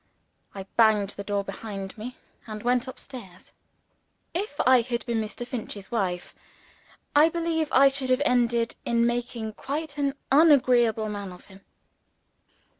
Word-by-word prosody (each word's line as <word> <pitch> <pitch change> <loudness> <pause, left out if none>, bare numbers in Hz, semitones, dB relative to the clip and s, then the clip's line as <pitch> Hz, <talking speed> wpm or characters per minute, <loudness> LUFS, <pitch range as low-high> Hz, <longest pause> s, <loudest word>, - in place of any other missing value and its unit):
I 195 - -5
banged 215 -3 +4
the 200 - -7
door 200 0 -1
behind 195 -1 -7
me, 240 +4 -8 0.3
and 215 -1 -7
went 245 +1 +1
up 260 - -8
stairs. 195 -9 -12 0.8
If 350 -4 -4
I 255 -1 +6
had 235 0 -3
been 235 -3 0
Mr. 220 +3 -6
Finch's 220 -5 -6
wife, 185 -6 -2 0.8
I 305 +3 +7
believe 330 -1 -1
I 275 +1 +7
should 270 -1 -1
have 255 +3 +3
ended 235 -2 +2
in 235 0 +2
making 240 -2 -2
quite 290 +4 -5
an 280 -1 0 0.2
agreeable 250 -7 +5
man 205 -2 -5
of 180 - -13
him. 195 0 -16
240 Hz, 145 wpm, -26 LUFS, 210-270 Hz, 0.8 s, I